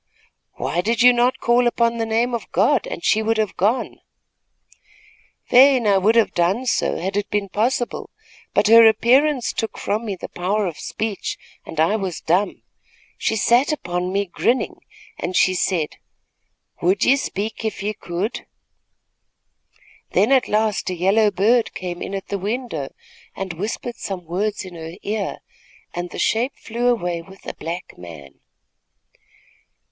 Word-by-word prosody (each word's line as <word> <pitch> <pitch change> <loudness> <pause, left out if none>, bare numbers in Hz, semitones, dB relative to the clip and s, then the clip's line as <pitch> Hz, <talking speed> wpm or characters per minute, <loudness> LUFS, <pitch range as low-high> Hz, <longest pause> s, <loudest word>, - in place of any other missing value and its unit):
"Why 175 - -1
did 230 +5 +1
you 250 0 +8
not 245 +1 +2
call 240 +1 +3
upon 235 0 +1
the 225 - -1
name 230 +2 +1
of 235 - -4
God, 285 -6 +2
and 170 - -6
she 220 - +3
would 225 +1 0
have 215 -2 -1
gone?" 215 +7 0 1.5
"Fain 260 0 +6 0.2
would 220 +4 +3
I - - +9
have - - -4
done 185 +9 +1
so, 250 - 0
had 190 +3 -3
it 205 0 -1
been 205 -1 -1
possible; 240 +5 -1 0.4
but - - +2
her 225 +1 +8
appearance 250 +4 +3
took 225 - -3
from 215 +3 -2
me 205 -3 -3
the - - -8
power 200 +4 -1
of 170 -4 -5
speech, 215 -3 -4 0.3
and 160 - -6
I 170 +7 +3
was 190 -5 -4
dumb. 185 +5 0 0.6
She 220 - 0
sat 240 +6 +3
upon 180 -10 -2
me, 200 +1 0
grinning 235 +7 0
at - - -20
me, - - -38 0.3
and 180 - -3
she 185 - +4
said: 175 -4 -1 0.8
"'Would 185 +3 +2
ye 270 - +6
speak 220 -5 -4
if 220 -3 -3
ye 210 +1 -1
could?' 185 +3 -4 1.7
"Then 220 - +3
at 265 -2 +4
last 215 -2 0
a 185 - -2
yellow 200 +5 +3
bird 215 +5 +2
came 175 -2 -5
in 200 - -4
at 195 - -6
the 200 - -2
window 205 - -3 0.4
and 190 -2 -4
whispered 215 +6 -4
some 185 -3 -5
words 200 +5 -2
in 185 - -10
her 165 0 -8
ear, 210 0 -3 0.5
and 175 0 -4
the - - -9
shape 235 +5 0
flew 235 +2 -2
away 175 -8 0
with 190 +3 -16
a - - -5
black 170 +3 -7
man." 80 -6 -11
210 Hz, 165 wpm, -21 LUFS, 180-235 Hz, 1.7 s, I